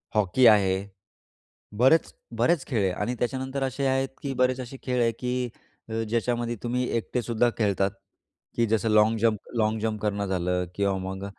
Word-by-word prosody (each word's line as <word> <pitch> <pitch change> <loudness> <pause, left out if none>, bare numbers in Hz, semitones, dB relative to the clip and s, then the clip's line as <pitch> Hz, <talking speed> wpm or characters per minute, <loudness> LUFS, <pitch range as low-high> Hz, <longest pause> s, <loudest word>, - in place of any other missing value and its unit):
Hockey 105 +5 +3
आहे. 100 -4 +5 1.1
बरेच, 135 +6 +4 0.3
बरेच 170 -4 +2
खेळ 115 -7 0
आहे 95 - +2
आणि 110 +6 -2
त्याच्यानंतर 130 +2 -2
असे 135 +1 -1
आहेत, 135 0 +1
की 140 -1 -3
बरेच 130 0 +1
असे 130 +1 -7
खेळ 125 -1 -1
आहे, 115 -1 +2
की 125 0 -3 0.4
अ, - - -5 0.2
ज्याच्यामध्ये 120 +1 -1
तुम्ही 125 +1 -1
एकटेसुद्धा 120 0 0
खेळतात, 100 -3 +1 0.7
की 115 - +2
जसं 110 +1 +1
लॉन्ग 110 +1 +4
जम्प 115 -2 +2 0.2
लॉन्ग 110 0 +1
जंप 110 -1 -2
करणं 100 -1 -1
झालं 90 -1 0
किंवा 100 -1 +1
मग 95 +1 -5
115 Hz, 165 wpm, -26 LUFS, 105-125 Hz, 1.1 s, आहे